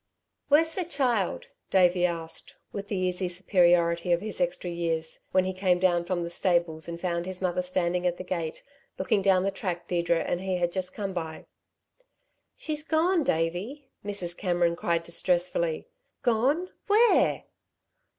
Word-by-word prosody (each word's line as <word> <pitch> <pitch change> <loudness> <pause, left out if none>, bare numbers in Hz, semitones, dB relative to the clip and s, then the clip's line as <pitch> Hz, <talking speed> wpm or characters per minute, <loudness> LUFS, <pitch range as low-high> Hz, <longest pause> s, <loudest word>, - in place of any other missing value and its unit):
"Where's 320 +3 +4
the 370 - -1
child?" 255 - 0 0.2
Davey 180 -1 +4
asked, 165 -1 -6 0.2
with 200 0 -6
the 205 - -3
easy 185 0 0
superiority 175 -2 +3
of 170 - +4
his 210 -2 -5
extra 175 0 -1
years, 165 -2 -2
when 185 - +4
he 185 - -2
came 185 -1 +2
down 175 -1 +2
from 175 -1 -1
the 170 - -5
stables 170 -3 +1
and 170 0 -5
found 170 -1 -2
his 185 -1 -4
mother 180 -1 0
standing 180 0 0
at 175 0 -1
the - - -6
gate, 170 -3 -4 0.3
looking 215 -4 +1
down 190 -1 +4
the 195 - +1
track 175 -3 -4
Deirdre 170 -2 +1
and 175 - -2
he 190 -1 -1
had 175 -1 0
just 185 0 -3
come 200 -3 -3
by. 160 -3 -5 1.1
"She's 305 -1 -2
gone, 320 +3 +2
Davey," 210 - -2
Mrs. 200 -4 -2
Cameron 175 -3 +1
cried 170 -1 0
distressfully. 170 -1 0 0.4
"Gone 270 +10 +2 0.2
where?" 445 +3 +4
180 Hz, 160 wpm, -27 LUFS, 170-200 Hz, 1.1 s, Where's